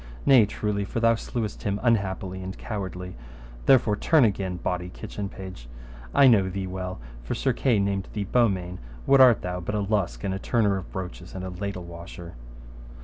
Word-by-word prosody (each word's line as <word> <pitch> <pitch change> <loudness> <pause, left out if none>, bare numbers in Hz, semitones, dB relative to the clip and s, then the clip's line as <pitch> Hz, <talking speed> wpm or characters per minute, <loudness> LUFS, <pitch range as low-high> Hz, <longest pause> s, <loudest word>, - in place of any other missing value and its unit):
Nay 125 -6 +7
truly, 105 -1 -2
for 100 - -3
thou 115 0 +5
slewest 115 -1 -4
him 100 0 -1
unhappily 95 -5 0
and 95 +1 -6
cowardly; 90 -3 -5 0.5
therefore 115 -5 +5
turn 150 +4 +4
again, 95 -3 -1
bawdy 90 0 -3
kitchen 100 +2 -6
page, 95 -13 -9 0.4
I 140 - +6
know 105 -7 +5
thee 95 +1 -3
well, 90 -2 -5 0.2
for - - -3
Sir - - +1
Kay 125 -5 +2
named 100 -1 0
thee 105 - -2
Beaumains. 95 -5 +1 0.3
What 135 0 +6
art 125 -4 +6
thou 90 0 -3
but 95 +4 -3
a - - +1
lusk 100 -2 -1
and 95 -1 -1
a 95 - -3
turner 105 -3 +2
of 95 -3 -6
broaches 90 -1 -7
and 95 0 -5
a 95 - -5
ladle 95 0 -4
washer? 85 0 -9
95 Hz, 185 wpm, -26 LUFS, 90-105 Hz, 0.5 s, Nay